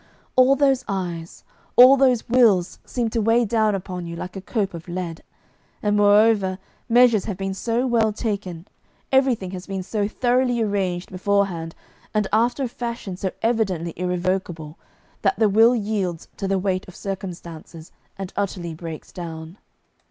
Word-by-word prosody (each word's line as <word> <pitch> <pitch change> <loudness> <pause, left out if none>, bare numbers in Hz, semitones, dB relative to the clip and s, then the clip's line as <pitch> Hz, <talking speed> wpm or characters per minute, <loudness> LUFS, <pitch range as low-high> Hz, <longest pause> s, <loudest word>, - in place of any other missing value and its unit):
All 255 +1 +6
those 270 -2 +2
eyes, 175 -4 -4 0.3
all 255 +2 +9
those 255 -4 +2
wills 225 -8 +3
seem 235 -3 -2
to 230 - 0
weigh 230 +2 +3
down 215 -1 +2
upon 180 -2 -5
you 170 - -6
like 180 +2 -7
a 195 - -5
cope 200 -1 -2
of 165 0 -9
lead, 175 -2 -5 0.6
and, 205 -1 +2
moreover, 205 -2 +4 0.3
measures 235 -3 +5
have 200 -4 -4
been 195 0 -3
so 230 +5 -1
well 230 -3 +2
taken, 200 -5 -4 0.4
everything 260 -8 +2
has 185 -1 -7
been 195 -1 -4
so 205 +1 -1
thoroughly 245 +2 +1
arranged 195 -4 -1
beforehand 185 -3 -1 0.4
and 210 -2 +2
after 240 +5 +2
a - - 0
fashion 235 -5 -5
so 190 +1 -2
evidently 195 -8 0
irrevocable, 180 -3 -2 0.4
that 390 - +1
the 220 - +4
will 225 +4 +5
yields 200 -6 -2
to 195 - -3
the 195 0 +1
weight 185 -1 -1
of 185 - -12
circumstances 175 -4 -7 0.3
and 190 -1 -6
utterly 180 -4 -3
breaks 160 -1 -8
down. 165 +1 -8
200 Hz, 155 wpm, -23 LUFS, 180-230 Hz, 0.6 s, all